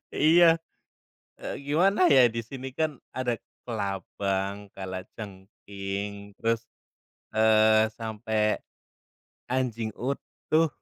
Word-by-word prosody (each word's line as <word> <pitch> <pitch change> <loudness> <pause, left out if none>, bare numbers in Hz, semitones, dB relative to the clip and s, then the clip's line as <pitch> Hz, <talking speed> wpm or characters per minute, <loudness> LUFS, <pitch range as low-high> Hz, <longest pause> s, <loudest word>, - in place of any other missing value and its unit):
Iya. 165 +2 +6 0.8
Eee, - - -5
gimana 180 +6 +4
ya, 130 -3 +8
di 115 - -2
sini 130 +2 -7
kan 155 -4 -1 0.2
ada 125 -2 0 0.3
kelabang, 100 -1 -2
kalajengking, 100 +1 -6
terus, 115 0 0 0.7
eee, 110 0 +5
sampai 110 -1 -1 0.9
anjing 120 -3 -1
utuh. 155 +4 0
110 Hz, 85 wpm, -27 LUFS, 100-130 Hz, 0.9 s, ya